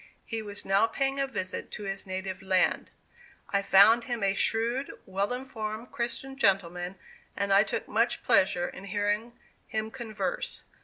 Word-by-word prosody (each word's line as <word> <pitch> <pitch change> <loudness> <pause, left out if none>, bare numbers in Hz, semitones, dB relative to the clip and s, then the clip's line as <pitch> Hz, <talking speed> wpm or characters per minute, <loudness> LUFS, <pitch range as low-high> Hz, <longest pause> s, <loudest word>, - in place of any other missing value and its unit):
He 225 -2 -3
was 205 -1 -7
now 195 +3 +4
paying 270 +3 -1
a 275 - +1
visit 185 -8 -4
to 210 - -6
his 195 0 -4
native 185 0 -4
land. 190 -1 +2 0.6
I 200 - +2
found 210 +4 +6
him 240 -4 -2
a 195 0 +3
shrewd, 235 +6 +1 0.2
well 195 +3 -1
informed 235 -3 -5
Christian 255 +3 -4
gentleman, 180 -5 +1 0.4
and 200 -1 +1
I 200 - +7
took 210 - -2
much 230 +3 +1
pleasure 190 -6 +3
in 195 - -9
hearing 205 +4 -1 0.3
him 220 0 -3
converse. 240 - -3
210 Hz, 155 wpm, -29 LUFS, 195-235 Hz, 0.6 s, I